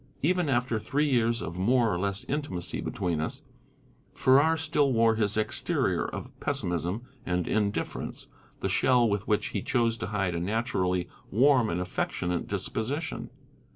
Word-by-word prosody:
Even 175 Hz, 0 st, +2 dB
after 120 Hz, -3 st, +1 dB
three 145 Hz, +7 st, 0 dB
years 120 Hz, -3 st, +2 dB
of 85 Hz, +2 st, -5 dB
more 115 Hz, +2 st, +3 dB
or 85 Hz, -, -1 dB
less 100 Hz, +1 st, -1 dB
intimacy 135 Hz, -, -3 dB
between 85 Hz, -5 st, -2 dB
us, 80 Hz, -, -4 dB, 0.7 s
Farrar 145 Hz, +5 st, +4 dB
still 145 Hz, -2 st, +1 dB
wore 115 Hz, -2 st, +4 dB
his 105 Hz, -2 st, 0 dB
exterior 110 Hz, -, +1 dB
of -, -, -6 dB
pessimism 90 Hz, +6 st, -2 dB, 0.2 s
and 90 Hz, -1 st, -1 dB
indifference, 105 Hz, -1 st, -2 dB, 0.4 s
the -, -, 0 dB
shell 125 Hz, -2 st, +3 dB
with 100 Hz, -1 st, -1 dB
which 105 Hz, -1 st, +1 dB
he -, -, -2 dB
chose 115 Hz, -3 st, +1 dB
to 90 Hz, -, -4 dB
hide 95 Hz, -4 st, -1 dB
a 85 Hz, -, -1 dB
naturally 95 Hz, -2 st, 0 dB, 0.2 s
warm 125 Hz, 0 st, +4 dB
and 85 Hz, -, -1 dB
affectionate 90 Hz, -1 st, -2 dB
disposition. 110 Hz, -, -3 dB
110 Hz, 150 wpm, -28 LUFS, 90-130 Hz, 0.7 s, Farrar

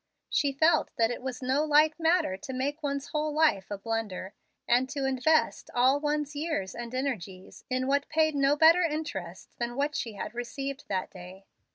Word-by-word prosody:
She 285 Hz, -, +2 dB
felt 310 Hz, +3 st, +3 dB
that 230 Hz, 0 st, +2 dB
it 245 Hz, -, -5 dB
was 255 Hz, 0 st, -5 dB
no 265 Hz, +4 st, +2 dB
light 305 Hz, +1 st, +4 dB
matter 325 Hz, -, +2 dB
to 230 Hz, +7 st, -8 dB
make 285 Hz, +4 st, -2 dB
one's 280 Hz, -1 st, -3 dB
whole 305 Hz, 0 st, -1 dB
life 295 Hz, -11 st, +2 dB
a 205 Hz, -, -4 dB
blunder, 205 Hz, -3 st, -4 dB, 0.3 s
and 250 Hz, +2 st, +3 dB
to 280 Hz, -1 st, -2 dB
invest 270 Hz, +4 st, +1 dB
all 260 Hz, +3 st, +4 dB
one's 295 Hz, 0 st, -2 dB
years 290 Hz, -, -2 dB
and 240 Hz, +1 st, -6 dB
energies 195 Hz, -9 st, -5 dB
in 255 Hz, 0 st, 0 dB
what 280 Hz, +1 st, 0 dB
paid 315 Hz, 0 st, +2 dB
no 280 Hz, 0 st, +3 dB
better 325 Hz, +4 st, +6 dB
interest 295 Hz, -, -4 dB
than 240 Hz, +1 st, -3 dB, 0.2 s
she 230 Hz, -5 st, -3 dB
had 210 Hz, +2 st, -6 dB
received 270 Hz, +4 st, -5 dB
that 190 Hz, -2 st, -2 dB
day. 185 Hz, +1 st, -12 dB
270 Hz, 180 wpm, -28 LUFS, 230-300 Hz, 0.3 s, better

